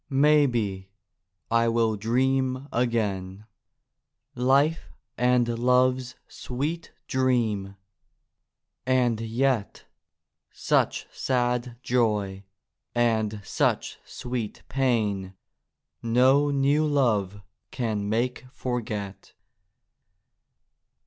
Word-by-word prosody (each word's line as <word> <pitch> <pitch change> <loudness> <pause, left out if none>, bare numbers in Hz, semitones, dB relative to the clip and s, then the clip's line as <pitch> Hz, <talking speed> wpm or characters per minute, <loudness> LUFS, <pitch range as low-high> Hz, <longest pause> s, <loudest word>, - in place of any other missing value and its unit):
Maybe, 125 -10 +2 0.6
I 115 0 +3
will 115 -1 +2
dream 130 +4 0
again: 105 -5 -1 0.9
Life 140 +6 +2 0.3
and 125 0 +2
love's 125 +1 +2
sweet 150 +7 -4 0.2
dream—and 115 +1 -2
yet, 115 0 -1 0.7
Such - - 0
sad 125 -1 -1
joy 105 -5 0 0.5
and 110 -3 +1
such - - -1
sweet 120 -4 -5
pain 105 -8 0 0.7
No 130 +5 +4
new 145 +2 +2
love 105 -9 0 0.3
can 110 -5 -2
make 125 +3 -1
forget. 110 -7 -5
120 Hz, 70 wpm, -26 LUFS, 105-130 Hz, 0.9 s, No